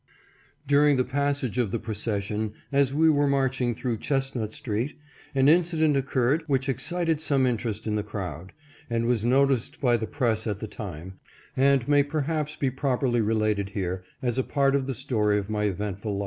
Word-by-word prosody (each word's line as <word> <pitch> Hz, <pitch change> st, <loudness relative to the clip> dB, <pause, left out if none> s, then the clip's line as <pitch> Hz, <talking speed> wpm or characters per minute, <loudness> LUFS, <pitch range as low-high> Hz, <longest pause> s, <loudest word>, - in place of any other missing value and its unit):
During 145 Hz, 0 st, +4 dB
the 130 Hz, -, +3 dB
passage 140 Hz, -2 st, -1 dB
of 120 Hz, -4 st, +1 dB
the 115 Hz, -, -1 dB
procession, 105 Hz, -1 st, -3 dB, 0.2 s
as 140 Hz, -1 st, +3 dB
we 160 Hz, +3 st, +3 dB
were 145 Hz, -2 st, +4 dB
marching 130 Hz, -3 st, +1 dB
through 120 Hz, -1 st, -2 dB
Chestnut 135 Hz, -6 st, -2 dB
street, 115 Hz, +5 st, -3 dB, 0.4 s
an 135 Hz, 0 st, +4 dB
incident 160 Hz, -2 st, +3 dB
occurred 135 Hz, +2 st, +1 dB
which 135 Hz, -2 st, 0 dB
excited 165 Hz, +4 st, -1 dB
some 140 Hz, -4 st, +2 dB
interest 115 Hz, -3 st, -2 dB
in 105 Hz, -1 st, -1 dB
the -, -, 0 dB
crowd, 95 Hz, -4 st, -6 dB, 0.4 s
and 115 Hz, 0 st, 0 dB
was 120 Hz, -3 st, +1 dB
noticed 135 Hz, +3 st, +2 dB
by 120 Hz, -3 st, +3 dB
the 110 Hz, -1 st, -4 dB
press 115 Hz, -6 st, -1 dB
at 105 Hz, -2 st, -1 dB
the 110 Hz, -, -6 dB
time, 95 Hz, -3 st, -8 dB, 0.4 s
and 135 Hz, -2 st, +3 dB
may 145 Hz, -1 st, +5 dB
perhaps 155 Hz, +1 st, -2 dB
be 135 Hz, -2 st, 0 dB
properly 130 Hz, -2 st, 0 dB
related 110 Hz, -2 st, 0 dB
here 95 Hz, -2 st, -3 dB, 0.2 s
as 120 Hz, 0 st, 0 dB
a -, -, +2 dB
part 140 Hz, 0 st, +1 dB
of 135 Hz, -1 st, 0 dB
the 135 Hz, -, -2 dB
story 105 Hz, -2 st, +1 dB
of 100 Hz, +1 st, -3 dB
my 105 Hz, -1 st, 0 dB
eventful 100 Hz, +1 st, -3 dB
life. -, -, -3 dB
125 Hz, 180 wpm, -26 LUFS, 110-140 Hz, 0.4 s, may